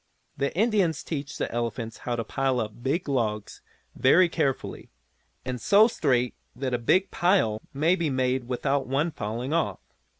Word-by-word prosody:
The 140 Hz, 0 st, -1 dB
Indians 200 Hz, -7 st, +2 dB
teach 140 Hz, -3 st, -5 dB
the -, -, -2 dB
elephants 115 Hz, -1 st, -3 dB
how 120 Hz, -, +1 dB
to 115 Hz, -, -2 dB
pile 135 Hz, +2 st, 0 dB
up 110 Hz, +1 st, -5 dB
big 145 Hz, +8 st, -1 dB
logs 110 Hz, -6 st, -2 dB, 0.3 s
very 175 Hz, +7 st, +5 dB
carefully, 150 Hz, -6 st, -2 dB, 0.6 s
and 125 Hz, -2 st, -4 dB
so 205 Hz, -, +6 dB
straight 125 Hz, -, +1 dB, 0.2 s
that 130 Hz, 0 st, -3 dB
a 120 Hz, -, +1 dB
big 185 Hz, +11 st, +2 dB
pile 175 Hz, -, +2 dB
may 155 Hz, +6 st, +2 dB
be 170 Hz, -4 st, -1 dB
made 130 Hz, -1 st, 0 dB
without 135 Hz, +2 st, -1 dB
one 145 Hz, +6 st, 0 dB
falling 120 Hz, +3 st, -4 dB
off. 165 Hz, -1 st, 0 dB
135 Hz, 160 wpm, -26 LUFS, 120-165 Hz, 0.6 s, so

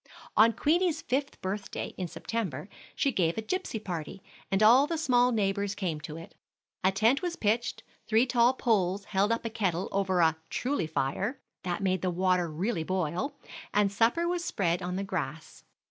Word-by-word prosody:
On 225 Hz, +2 st, +7 dB
Queenie's 325 Hz, +5 st, +1 dB
fifth 275 Hz, +2 st, -2 dB
birthday, 195 Hz, +2 st, -4 dB
in 180 Hz, -, -3 dB
September, 185 Hz, -, -4 dB, 0.3 s
she 275 Hz, -, +1 dB
had 170 Hz, -1 st, +1 dB
a -, -, 0 dB
gipsy 370 Hz, -, -2 dB
party, 180 Hz, -3 st, -6 dB, 0.3 s
and 195 Hz, +2 st, +2 dB
all 250 Hz, +6 st, +7 dB
the 330 Hz, -, -2 dB
small 250 Hz, -5 st, +3 dB
neighbors 200 Hz, -2 st, 0 dB
came 170 Hz, -6 st, -2 dB
to 155 Hz, 0 st, -7 dB
it. 165 Hz, -, -11 dB, 0.5 s
A 190 Hz, -, +4 dB
tent 220 Hz, +7 st, +3 dB
was 350 Hz, -2 st, -2 dB
pitched, 225 Hz, -2 st, 0 dB, 0.2 s
three 225 Hz, +3 st, +4 dB
tall 245 Hz, 0 st, +4 dB
poles 200 Hz, -5 st, +1 dB
held 200 Hz, +2 st, +1 dB
up 230 Hz, 0 st, -1 dB
a -, -, 0 dB
kettle 190 Hz, -5 st, -1 dB
over 190 Hz, -2 st, +1 dB
a 160 Hz, -1 st, +4 dB
"truly 255 Hz, -, -1 dB
fire" 145 Hz, -, -2 dB, 0.2 s
that 185 Hz, +2 st, -3 dB
made 185 Hz, -2 st, +1 dB
the 185 Hz, -, 0 dB
water 180 Hz, -1 st, +1 dB
really 170 Hz, +2 st, -1 dB
boil, 185 Hz, -, -2 dB, 0.4 s
and 205 Hz, -1 st, +3 dB
supper 235 Hz, +12 st, +2 dB
was 350 Hz, 0 st, -1 dB
spread 180 Hz, -, 0 dB
on 180 Hz, 0 st, -3 dB
the 195 Hz, -, -2 dB
grass. 175 Hz, -5 st, -5 dB
200 Hz, 175 wpm, -29 LUFS, 180-240 Hz, 0.5 s, On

